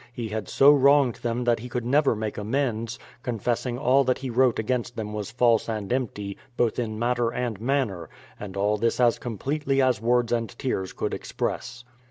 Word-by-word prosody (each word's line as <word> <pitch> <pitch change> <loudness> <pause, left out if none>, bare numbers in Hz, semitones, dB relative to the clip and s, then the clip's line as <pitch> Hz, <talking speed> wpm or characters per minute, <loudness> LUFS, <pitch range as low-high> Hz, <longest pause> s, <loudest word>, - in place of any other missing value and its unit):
he 120 -2 -5
had 105 -2 -4
so 140 +2 +6
wronged 140 -2 +5
them 120 +1 -2
that 120 -1 +2
he 125 +2 -8
could 120 -1 -3
never 140 0 +3
make 110 -1 -3
amends, 115 0 -2 0.2
confessing 120 +1 -2
all 135 +1 +3
that 130 -1 +1
he 130 -2 -5
wrote 125 0 +3
against 120 +2 -2
them 105 -1 -5
was 105 -2 -4
false 120 -2 +2
and 110 0 -2
empty, 105 -6 -3 0.2
both 120 0 +1
in 110 -3 -3
matter 120 0 +1
and 120 -4 -3
manner 120 - -1
— - - -24
and 100 -2 -7
all 105 +2 +1
this 115 +3 0
as 120 -2 +3
completely 135 +4 -2
as 130 -5 +2
words 120 0 +2
and 115 0 -2
tears 95 -8 -2
could - - -3
express. 120 0 -4
120 Hz, 195 wpm, -25 LUFS, 110-125 Hz, 0.2 s, so